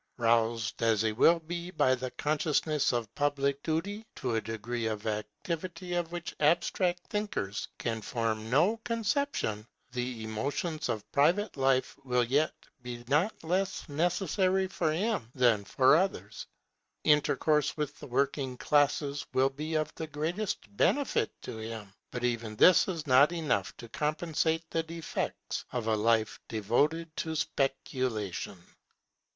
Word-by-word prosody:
Roused 115 Hz, -2 st, +1 dB
as 115 Hz, -2 st, +3 dB
he 110 Hz, -, +2 dB
will 165 Hz, +10 st, +5 dB
be 170 Hz, +2 st, -5 dB
by 140 Hz, -7 st, +3 dB
the 130 Hz, 0 st, -2 dB
consciousness 150 Hz, +1 st, +1 dB
of 120 Hz, -4 st, -2 dB
public 140 Hz, -1 st, 0 dB
duty 185 Hz, +8 st, -2 dB
to 125 Hz, -3 st, -2 dB
a 110 Hz, -, +1 dB
degree 115 Hz, +1 st, -3 dB
of 105 Hz, -1 st, -4 dB
activity 165 Hz, -, -4 dB
of 175 Hz, -1 st, -1 dB
which 175 Hz, 0 st, -5 dB
abstract 175 Hz, +3 st, +2 dB
thinkers 205 Hz, -, -3 dB
can 115 Hz, -2 st, -2 dB
form 110 Hz, -1 st, -2 dB
no 170 Hz, -, +3 dB
conception, 225 Hz, -, -1 dB, 0.3 s
the 125 Hz, -2 st, -3 dB
emotions 145 Hz, +8 st, -2 dB
of 105 Hz, -2 st, -3 dB
private 175 Hz, +9 st, +2 dB
life 135 Hz, 0 st, +1 dB
will 125 Hz, -2 st, +2 dB
yet 140 Hz, +6 st, +1 dB, 0.3 s
be 120 Hz, -1 st, -7 dB
not 160 Hz, +10 st, +1 dB
less 185 Hz, +4 st, -1 dB
necessary 185 Hz, +4 st, +1 dB
for 175 Hz, -4 st, -1 dB
him 195 Hz, -, -1 dB
than 120 Hz, -5 st, +3 dB
for 130 Hz, +5 st, +4 dB
others. 110 Hz, -, -1 dB, 0.6 s
Intercourse 150 Hz, 0 st, +3 dB
with 145 Hz, -1 st, -3 dB
the -, -, -9 dB
working 135 Hz, 0 st, 0 dB
classes 145 Hz, 0 st, +1 dB
will 135 Hz, +1 st, +4 dB
be 155 Hz, +4 st, -4 dB
of 155 Hz, 0 st, 0 dB
the 160 Hz, -, -5 dB
greatest 165 Hz, +8 st, -2 dB, 0.2 s
benefit 280 Hz, -, +2 dB
to -, -, -6 dB
him; 110 Hz, -3 st, -7 dB, 0.2 s
but 125 Hz, -, -5 dB
even 115 Hz, -3 st, -1 dB
this 180 Hz, +10 st, +6 dB
is 170 Hz, -5 st, -3 dB
not 140 Hz, +3 st, +6 dB
enough 155 Hz, -, -1 dB
to 120 Hz, -, -9 dB
compensate 160 Hz, +4 st, -1 dB
the 165 Hz, -, +1 dB
defects 165 Hz, 0 st, -4 dB
of 125 Hz, -3 st, -2 dB
a 110 Hz, -1 st, +2 dB
life 110 Hz, 0 st, +2 dB
devoted 145 Hz, +10 st, 0 dB
to 160 Hz, -1 st, -2 dB
speculation. 130 Hz, -, -2 dB
145 Hz, 140 wpm, -30 LUFS, 115-165 Hz, 0.6 s, this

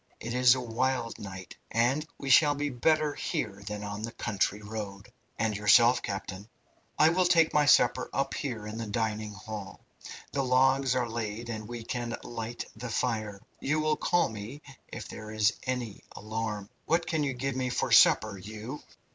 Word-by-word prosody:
It 115 Hz, +1 st, -5 dB
is 125 Hz, 0 st, +6 dB
a -, -, -2 dB
wild 125 Hz, 0 st, -1 dB
night, 95 Hz, -2 st, -8 dB
and 130 Hz, +7 st, +1 dB
we 135 Hz, -1 st, -2 dB
shall 145 Hz, +2 st, +6 dB
be 145 Hz, 0 st, -2 dB
better 150 Hz, +4 st, +2 dB
here 100 Hz, -7 st, -3 dB
than 105 Hz, 0 st, -4 dB
on 105 Hz, 0 st, -5 dB
the 115 Hz, +1 st, -4 dB
country 105 Hz, -1 st, -1 dB
road." 105 Hz, +1 st, -7 dB, 0.2 s
"And 110 Hz, -2 st, 0 dB
yourself, 115 Hz, +4 st, +5 dB
captain?" 100 Hz, +1 st, -5 dB, 0.5 s
"I 155 Hz, -, +6 dB
will 180 Hz, +2 st, +2 dB
take 165 Hz, -2 st, +4 dB
my 150 Hz, -1 st, +4 dB
supper -, -, +4 dB
up 135 Hz, 0 st, -1 dB
here 115 Hz, -6 st, -4 dB
in 105 Hz, +1 st, -6 dB
the 115 Hz, -, -4 dB
dining 110 Hz, 0 st, -2 dB
hall. 105 Hz, 0 st, -8 dB, 0.5 s
The 140 Hz, -, 0 dB
logs 130 Hz, +1 st, +3 dB
are 125 Hz, -2 st, +1 dB
laid 115 Hz, 0 st, -4 dB
and 110 Hz, -2 st, -5 dB
we 120 Hz, 0 st, -6 dB
can 120 Hz, 0 st, -3 dB
light 115 Hz, 0 st, -5 dB
the 120 Hz, +3 st, -6 dB
fire. 110 Hz, -4 st, -2 dB, 0.2 s
You 155 Hz, +3 st, 0 dB
will 155 Hz, 0 st, +2 dB
call 175 Hz, +3 st, +2 dB
me 110 Hz, +7 st, -8 dB, 0.2 s
if -, -, -7 dB
there 110 Hz, 0 st, -8 dB
is 110 Hz, 0 st, +2 dB
any 125 Hz, -5 st, -3 dB
alarm. 105 Hz, -1 st, -4 dB, 0.2 s
What 165 Hz, +1 st, +2 dB
can 160 Hz, -2 st, 0 dB
you 140 Hz, -2 st, -1 dB
give 135 Hz, +1 st, -2 dB
me 130 Hz, -1 st, -1 dB
for 125 Hz, -, -1 dB
supper 105 Hz, -2 st, +6 dB
you?" 110 Hz, +8 st, -7 dB
115 Hz, 180 wpm, -29 LUFS, 105-130 Hz, 0.5 s, is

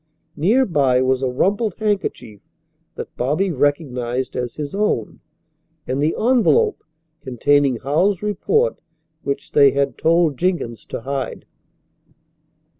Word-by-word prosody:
Near 225 Hz, -, +3 dB
by 135 Hz, -, +2 dB
was 130 Hz, 0 st, +1 dB
a 130 Hz, -, 0 dB
rumpled 200 Hz, -, 0 dB
handkerchief 195 Hz, -, -3 dB, 0.5 s
that -, -, -8 dB
Bobby 155 Hz, +10 st, 0 dB
recognized 130 Hz, -4 st, -1 dB
as 125 Hz, -2 st, -3 dB
his 145 Hz, -2 st, -5 dB
own, 200 Hz, -, -1 dB, 0.7 s
and 130 Hz, +2 st, -2 dB
the 155 Hz, +2 st, +1 dB
envelope, 260 Hz, -, +2 dB, 0.4 s
containing 135 Hz, +1 st, +2 dB
Howells's 170 Hz, -, 0 dB
report 445 Hz, -, 0 dB, 0.4 s
which 140 Hz, 0 st, -4 dB
they 140 Hz, -2 st, +5 dB
had 140 Hz, -3 st, -1 dB
told 165 Hz, -3 st, +2 dB
Jenkins 170 Hz, -10 st, -2 dB
to -, -, -6 dB
hide. 135 Hz, +1 st, -4 dB
145 Hz, 115 wpm, -20 LUFS, 130-195 Hz, 0.7 s, they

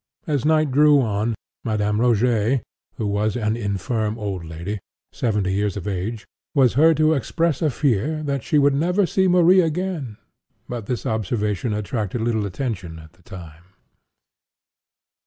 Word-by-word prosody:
As 145 Hz, -4 st, -1 dB
night 155 Hz, -2 st, +3 dB
drew 145 Hz, +1 st, +5 dB
on, 110 Hz, -1 st, 0 dB, 0.3 s
Madame 105 Hz, -2 st, 0 dB
Rogêt 120 Hz, +1 st, +2 dB, 0.3 s
(who 110 Hz, -, -3 dB
was 105 Hz, +2 st, 0 dB
an 110 Hz, -1 st, 0 dB
infirm 110 Hz, +1 st, -2 dB
old 100 Hz, -5 st, -4 dB
lady, 85 Hz, +6 st, -5 dB, 0.3 s
seventy 105 Hz, -5 st, -1 dB
years 100 Hz, 0 st, -1 dB
of 100 Hz, -, -6 dB
age,) 105 Hz, +3 st, -3 dB, 0.3 s
was 130 Hz, -4 st, +4 dB
heard 160 Hz, +4 st, +5 dB
to 155 Hz, 0 st, +4 dB
express 160 Hz, +2 st, -1 dB
a 155 Hz, -, +2 dB
fear 145 Hz, +3 st, 0 dB
"that 140 Hz, -2 st, -2 dB
she 150 Hz, -, 0 dB
should 145 Hz, -1 st, +4 dB
never 180 Hz, +7 st, +2 dB
see 190 Hz, +2 st, +1 dB
Marie 180 Hz, +1 st, +5 dB
again;" 160 Hz, -, -3 dB, 0.5 s
but 120 Hz, -4 st, -6 dB
this 125 Hz, -, -3 dB
observation 105 Hz, 0 st, -1 dB
attracted 105 Hz, +1 st, -3 dB
little 110 Hz, -3 st, 0 dB
attention 95 Hz, -6 st, -4 dB
at 80 Hz, 0 st, -14 dB
the 90 Hz, -, -26 dB
time. 85 Hz, 0 st, -12 dB
115 Hz, 150 wpm, -22 LUFS, 100-145 Hz, 0.5 s, drew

